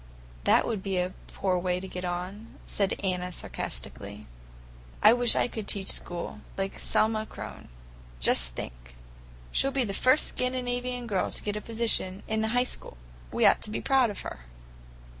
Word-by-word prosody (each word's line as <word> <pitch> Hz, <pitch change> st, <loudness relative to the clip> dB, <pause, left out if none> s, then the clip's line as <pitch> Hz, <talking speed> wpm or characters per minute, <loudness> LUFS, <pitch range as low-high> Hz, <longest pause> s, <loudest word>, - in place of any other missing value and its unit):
"That -, -, +5 dB
would 215 Hz, -4 st, -2 dB
be 195 Hz, -1 st, -1 dB
a 180 Hz, +1 st, 0 dB
poor 185 Hz, -2 st, 0 dB
way 180 Hz, 0 st, 0 dB
to 190 Hz, -, -7 dB
get 180 Hz, 0 st, -6 dB
on," 180 Hz, +5 st, -4 dB
said 200 Hz, -2 st, 0 dB
Anna 180 Hz, -1 st, -1 dB
sarcastically. 105 Hz, -, -5 dB, 0.8 s
"I 215 Hz, -, +9 dB
wish 245 Hz, -1 st, +5 dB
I -, -, +3 dB
could 220 Hz, -4 st, -6 dB
teach 195 Hz, -2 st, +1 dB
school, 175 Hz, -1 st, -3 dB, 0.2 s
like 195 Hz, 0 st, -2 dB
Selma 220 Hz, 0 st, +1 dB
Kronn. -, -, -8 dB, 0.5 s
Just -, -, +3 dB
think! -, -, -8 dB, 0.6 s
She'll 275 Hz, -, +5 dB
be 275 Hz, -1 st, +1 dB
the 200 Hz, -4 st, -3 dB
first 255 Hz, +8 st, +5 dB
Scandinavian 250 Hz, -1 st, -1 dB
girl 200 Hz, -5 st, 0 dB
to -, -, -3 dB
get 205 Hz, 0 st, -2 dB
a 210 Hz, -, -3 dB
position 220 Hz, -4 st, 0 dB
in 220 Hz, 0 st, 0 dB
the 220 Hz, -, +1 dB
High 245 Hz, -, +5 dB
School. 245 Hz, -, -6 dB, 0.3 s
We -, -, +2 dB
ought -, -, +6 dB
to -, -, -3 dB
be 215 Hz, -, -2 dB
proud 265 Hz, -3 st, +3 dB
of 205 Hz, -, -4 dB
her." -, -, -6 dB
200 Hz, 175 wpm, -28 LUFS, 180-235 Hz, 0.8 s, I